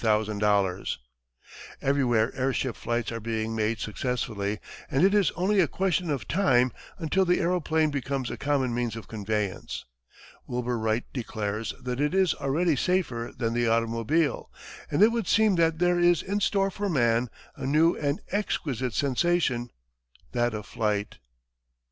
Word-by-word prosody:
Everywhere 125 Hz, -5 st, +2 dB
air 135 Hz, 0 st, 0 dB
ship 130 Hz, -3 st, -1 dB
flights 120 Hz, -1 st, -2 dB
are 115 Hz, -, -4 dB
being 110 Hz, 0 st, -2 dB
made 110 Hz, +1 st, 0 dB
successfully, 110 Hz, -2 st, -2 dB, 0.3 s
and 135 Hz, -, +2 dB
it 195 Hz, -, +4 dB
is 205 Hz, -4 st, +4 dB
only 195 Hz, +4 st, +2 dB
a 175 Hz, -, +5 dB
question 185 Hz, +1 st, 0 dB
of 135 Hz, -7 st, -2 dB
time 130 Hz, -10 st, +3 dB, 0.3 s
until 180 Hz, +3 st, +1 dB
the 180 Hz, -1 st, +2 dB
aeroplane 160 Hz, -3 st, +1 dB
becomes 135 Hz, -2 st, -2 dB
a -, -, -3 dB
common 140 Hz, -4 st, 0 dB
means 120 Hz, -2 st, -1 dB
of 115 Hz, -4 st, -8 dB
conveyance. 105 Hz, -3 st, -3 dB, 0.6 s
Wilbur 125 Hz, -1 st, -2 dB
Wright 110 Hz, +2 st, 0 dB
declares 110 Hz, -3 st, -3 dB
that 125 Hz, +1 st, -2 dB
it 150 Hz, +5 st, +1 dB
is 190 Hz, -2 st, +4 dB
already 150 Hz, +4 st, +1 dB
safer 130 Hz, -8 st, 0 dB
than 115 Hz, -2 st, -1 dB
the 120 Hz, 0 st, +1 dB
automobile, 115 Hz, +7 st, +1 dB, 0.4 s
and 160 Hz, +8 st, +3 dB
it 220 Hz, -, +7 dB
would 230 Hz, -5 st, -2 dB
seem 220 Hz, -1 st, +4 dB
that 165 Hz, -1 st, +3 dB
there 175 Hz, +1 st, +2 dB
is 175 Hz, -2 st, +4 dB
in 200 Hz, +2 st, -1 dB
store 195 Hz, -1 st, +1 dB
for 205 Hz, +1 st, -3 dB
man 120 Hz, -5 st, +2 dB, 0.3 s
a -, -, -5 dB
new 155 Hz, +4 st, +4 dB
and 145 Hz, 0 st, -1 dB
exquisite 135 Hz, -, -2 dB
sensation, 140 Hz, -3 st, +1 dB, 0.6 s
that 120 Hz, -2 st, 0 dB
of 105 Hz, -1 st, -5 dB
flight. 105 Hz, -2 st, -2 dB
130 Hz, 150 wpm, -27 LUFS, 115-175 Hz, 0.6 s, it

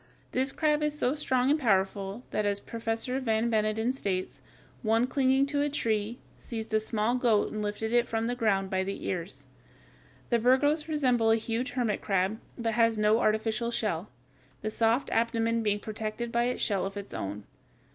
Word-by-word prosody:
This 265 Hz, +2 st, 0 dB
crab 300 Hz, 0 st, +1 dB
is 300 Hz, 0 st, 0 dB
so 255 Hz, -2 st, +1 dB
strong 260 Hz, -3 st, +1 dB
and 305 Hz, -, +3 dB
powerful 195 Hz, -1 st, 0 dB
that, 215 Hz, -, 0 dB
as 200 Hz, -1 st, +2 dB
Professor 230 Hz, +4 st, -2 dB
Van 230 Hz, -2 st, 0 dB
Beneden 220 Hz, +2 st, +1 dB
states, 190 Hz, -8 st, -3 dB, 0.4 s
one 225 Hz, +1 st, +2 dB
clinging 265 Hz, +1 st, +2 dB
to 285 Hz, 0 st, -1 dB
a 290 Hz, -, +1 dB
tree, 225 Hz, -5 st, -1 dB, 0.2 s
seized 225 Hz, -2 st, -6 dB
a 215 Hz, -, +4 dB
small 220 Hz, +1 st, 0 dB
goat 235 Hz, -4 st, +2 dB
and 215 Hz, -, -3 dB
lifted 210 Hz, +2 st, -2 dB
it 240 Hz, 0 st, +3 dB
from 225 Hz, 0 st, -1 dB
the 240 Hz, -, 0 dB
ground 200 Hz, -5 st, 0 dB
by 190 Hz, 0 st, +1 dB
the 195 Hz, +1 st, -5 dB
ears. 180 Hz, +1 st, -4 dB, 0.9 s
The 235 Hz, -, +4 dB
Birgos 290 Hz, +6 st, +3 dB
resembles 250 Hz, -7 st, +3 dB
a -, -, +1 dB
huge 230 Hz, +3 st, -3 dB
hermit 240 Hz, -5 st, 0 dB
crab, 195 Hz, +2 st, 0 dB, 0.2 s
but 230 Hz, -1 st, -1 dB
has 230 Hz, -1 st, +3 dB
no 215 Hz, +1 st, +3 dB
artificial 220 Hz, +2 st, +1 dB
shell, 210 Hz, -6 st, -2 dB, 0.5 s
the 215 Hz, -, -2 dB
soft 230 Hz, +4 st, +1 dB
abdomen 230 Hz, 0 st, +1 dB
being 210 Hz, -2 st, +1 dB
protected 220 Hz, +2 st, -4 dB
by 235 Hz, 0 st, +2 dB
a 250 Hz, 0 st, -1 dB
shell 200 Hz, -4 st, 0 dB
of 195 Hz, +1 st, -8 dB
its 200 Hz, 0 st, -7 dB
own. 100 Hz, +1 st, -4 dB
225 Hz, 180 wpm, -29 LUFS, 210-250 Hz, 0.9 s, a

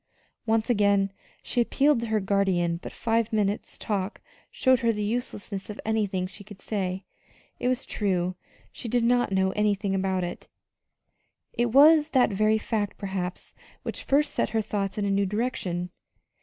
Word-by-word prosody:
Once 220 Hz, 0 st, +2 dB
again 200 Hz, -4 st, +3 dB, 0.3 s
she 245 Hz, -, 0 dB
appealed 280 Hz, +3 st, +3 dB
to 235 Hz, -, -3 dB
her 220 Hz, -1 st, +1 dB
guardian, 190 Hz, -4 st, +1 dB
but -, -, -7 dB
five 230 Hz, -1 st, 0 dB
minutes' 210 Hz, -1 st, -1 dB
talk 200 Hz, -2 st, -3 dB, 0.3 s
showed 260 Hz, -2 st, +3 dB
her 230 Hz, -1 st, +2 dB
the 210 Hz, -1 st, -3 dB
uselessness 205 Hz, -3 st, -3 dB
of 210 Hz, -, -7 dB
anything 205 Hz, -4 st, 0 dB
she 190 Hz, +2 st, -9 dB
could 205 Hz, -1 st, -13 dB
say 190 Hz, -2 st, -3 dB, 0.5 s
it -, -, -1 dB
was 255 Hz, +1 st, 0 dB
true, 185 Hz, -3 st, 0 dB, 0.4 s
she -, -, -7 dB
did 240 Hz, +1 st, +1 dB
not 245 Hz, -1 st, +2 dB
know 190 Hz, 0 st, +2 dB
anything 205 Hz, -1 st, 0 dB
about 190 Hz, -1 st, 0 dB
it. 175 Hz, -, -6 dB, 1.1 s
It 240 Hz, 0 st, +1 dB
was 300 Hz, +3 st, +7 dB
that 255 Hz, -4 st, +4 dB
very 215 Hz, +2 st, +3 dB
fact, 215 Hz, -2 st, -2 dB
perhaps, 190 Hz, -2 st, -4 dB, 0.3 s
which -, -, -5 dB
first 290 Hz, +2 st, +2 dB
sent -, -, 0 dB
her 220 Hz, 0 st, 0 dB
thoughts 200 Hz, -1 st, -3 dB
in 205 Hz, -, 0 dB
a 200 Hz, -, +1 dB
new 195 Hz, 0 st, +2 dB
direction. 185 Hz, -5 st, -2 dB
210 Hz, 165 wpm, -26 LUFS, 195-230 Hz, 1.1 s, was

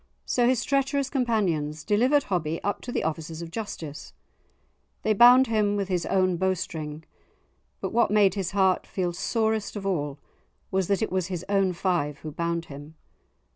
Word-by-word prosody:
So 245 Hz, -1 st, +2 dB
his 255 Hz, -2 st, +2 dB
treacherous 275 Hz, 0 st, 0 dB
companions 185 Hz, -, 0 dB
delivered 250 Hz, +7 st, +3 dB
Hobbie 165 Hz, -4 st, -2 dB
up 205 Hz, -, -2 dB
to 245 Hz, -, -6 dB
the -, -, -1 dB
officers 160 Hz, +1 st, -4 dB
of 165 Hz, -, -9 dB
justice; 170 Hz, -7 st, -6 dB, 0.9 s
they 215 Hz, -, +3 dB
bound 245 Hz, +4 st, +7 dB
him 210 Hz, -3 st, +1 dB
with 200 Hz, -1 st, -2 dB
his 175 Hz, -3 st, -1 dB
own 185 Hz, -2 st, +2 dB
bowstring, 165 Hz, -4 st, -3 dB, 0.8 s
but -, -, -3 dB
what 235 Hz, -, +3 dB
made 205 Hz, -2 st, +4 dB
his 195 Hz, -4 st, -2 dB
heart 190 Hz, -2 st, +2 dB
feel 180 Hz, -2 st, -2 dB
sorest 220 Hz, +2 st, -1 dB
of 200 Hz, -2 st, -5 dB
all, 150 Hz, -7 st, -1 dB, 0.5 s
was 190 Hz, -2 st, 0 dB
that 200 Hz, +2 st, +1 dB
it -, -, -2 dB
was 185 Hz, -2 st, 0 dB
his 180 Hz, -2 st, -5 dB
own 195 Hz, -2 st, +2 dB
five 175 Hz, -5 st, -1 dB
who 155 Hz, -, -6 dB
bound 170 Hz, +2 st, -2 dB
him. 145 Hz, +2 st, -11 dB
190 Hz, 170 wpm, -26 LUFS, 165-215 Hz, 0.9 s, bound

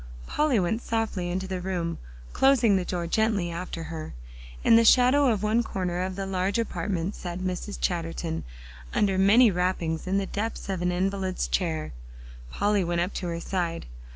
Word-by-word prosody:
Polly 300 Hz, -7 st, +1 dB
went 190 Hz, +6 st, 0 dB
softly 220 Hz, -7 st, -2 dB
into 185 Hz, +2 st, -2 dB
the 185 Hz, -1 st, -3 dB
room, 175 Hz, -3 st, -2 dB, 0.3 s
closing 250 Hz, -6 st, +4 dB
the 185 Hz, -, +1 dB
door 175 Hz, -1 st, -3 dB
gently 200 Hz, -1 st, +1 dB
after 170 Hz, -1 st, -5 dB
her. 160 Hz, -, -7 dB, 0.5 s
In 230 Hz, -, +6 dB
the 230 Hz, -, +6 dB
shadow 255 Hz, +4 st, +5 dB
of 215 Hz, -3 st, 0 dB
one 215 Hz, +3 st, +3 dB
corner 180 Hz, -5 st, -2 dB
of 185 Hz, 0 st, -3 dB
the 195 Hz, 0 st, -3 dB
large 190 Hz, +1 st, -1 dB
apartment, 185 Hz, -4 st, -2 dB
sat 175 Hz, -1 st, -6 dB
Mrs. 185 Hz, +2 st, -4 dB
Chatterton 165 Hz, -1 st, -2 dB, 0.5 s
under 195 Hz, -2 st, +2 dB
many 215 Hz, +4 st, +6 dB
wrappings 180 Hz, -2 st, -1 dB
in 190 Hz, +1 st, +1 dB
the 200 Hz, -, 0 dB
depths 210 Hz, +2 st, -4 dB
of 190 Hz, -2 st, -2 dB
an 180 Hz, 0 st, +1 dB
invalid's 190 Hz, +1 st, -1 dB
chair. 160 Hz, -, -1 dB, 0.6 s
Polly 205 Hz, -, +1 dB
went 175 Hz, 0 st, -1 dB
up 180 Hz, +3 st, -2 dB
to 180 Hz, -, -4 dB
her 170 Hz, -1 st, -3 dB
side. 170 Hz, -2 st, -2 dB
185 Hz, 175 wpm, -26 LUFS, 175-210 Hz, 0.6 s, In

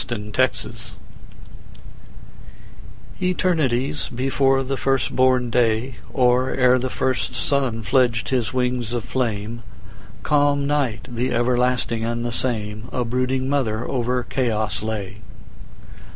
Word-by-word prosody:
Mother 120 Hz, -, -1 dB
Night 105 Hz, +5 st, 0 dB, 2.6 s
ETERNITIES 150 Hz, -, 0 dB
before 135 Hz, +1 st, +1 dB
the 135 Hz, +1 st, -2 dB
first 135 Hz, -1 st, 0 dB
born 130 Hz, -2 st, +3 dB
day, 120 Hz, +1 st, +1 dB
Or 125 Hz, 0 st, +3 dB
ere 125 Hz, -1 st, +4 dB
the 130 Hz, +1 st, -2 dB
first 130 Hz, +1 st, -1 dB
sun 130 Hz, -5 st, 0 dB
fledged 115 Hz, +1 st, +2 dB
his 125 Hz, -5 st, 0 dB
wings 125 Hz, -2 st, -1 dB
of 120 Hz, -2 st, -2 dB
flame, 115 Hz, -2 st, -2 dB, 0.6 s
Calm 145 Hz, -1 st, +2 dB
Night, 140 Hz, -6 st, 0 dB
the 125 Hz, 0 st, -2 dB
everlasting 120 Hz, -1 st, +1 dB
and 120 Hz, +1 st, -2 dB
the 120 Hz, -, -2 dB
same,A 115 Hz, 0 st, -2 dB
brooding 130 Hz, +2 st, 0 dB
mother 120 Hz, -5 st, 0 dB
over 125 Hz, -1 st, 0 dB
chaos 110 Hz, -4 st, -1 dB
lay. 105 Hz, -2 st, -4 dB
125 Hz, 110 wpm, -22 LUFS, 115-130 Hz, 2.6 s, ere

